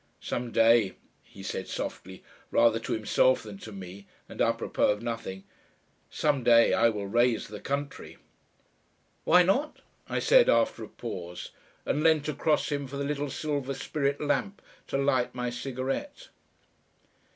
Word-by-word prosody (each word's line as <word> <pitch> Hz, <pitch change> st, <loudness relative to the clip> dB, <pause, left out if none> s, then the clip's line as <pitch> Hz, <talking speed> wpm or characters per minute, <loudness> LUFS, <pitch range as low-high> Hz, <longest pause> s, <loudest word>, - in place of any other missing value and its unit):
"Some 120 Hz, 0 st, -4 dB
day," 115 Hz, -4 st, +4 dB, 0.3 s
he 95 Hz, -, -14 dB
said 95 Hz, 0 st, -4 dB
softly, 95 Hz, 0 st, -6 dB, 0.3 s
rather 115 Hz, -1 st, +4 dB
to 115 Hz, -, -3 dB
himself 115 Hz, +3 st, +2 dB
than 105 Hz, -3 st, -9 dB
to 110 Hz, -, -9 dB
me, 95 Hz, 0 st, -10 dB, 0.2 s
and -, -, -6 dB
A -, -, +4 dB
PROPOS -, -, 0 dB
of 105 Hz, +2 st, -9 dB
nothing 115 Hz, -5 st, -5 dB, 0.7 s
"some 145 Hz, -4 st, 0 dB
day 115 Hz, -1 st, +6 dB
I 115 Hz, -, +4 dB
will 105 Hz, -3 st, -4 dB
raise 120 Hz, +2 st, +1 dB
the 105 Hz, 0 st, -8 dB
country." 140 Hz, 0 st, -5 dB, 1.1 s
"Why 180 Hz, -, +6 dB
not?" 260 Hz, -, 0 dB, 0.3 s
I -, -, -1 dB
said, -, -, +5 dB
after -, -, +2 dB
a -, -, -7 dB
pause, 90 Hz, -7 st, -7 dB, 0.3 s
and 150 Hz, -, 0 dB
leant 155 Hz, -2 st, +3 dB
across 155 Hz, +1 st, 0 dB
him 140 Hz, -1 st, -2 dB
for 140 Hz, +2 st, -7 dB
the 140 Hz, -, -2 dB
little 145 Hz, 0 st, -2 dB
silver 140 Hz, -2 st, -3 dB
spirit 140 Hz, +1 st, -2 dB
lamp, 195 Hz, +7 st, -1 dB, 0.2 s
to -, -, -1 dB
light 135 Hz, -3 st, +1 dB
my 125 Hz, -1 st, -2 dB
cigarette.... 135 Hz, -, -4 dB
125 Hz, 150 wpm, -28 LUFS, 110-145 Hz, 1.1 s, day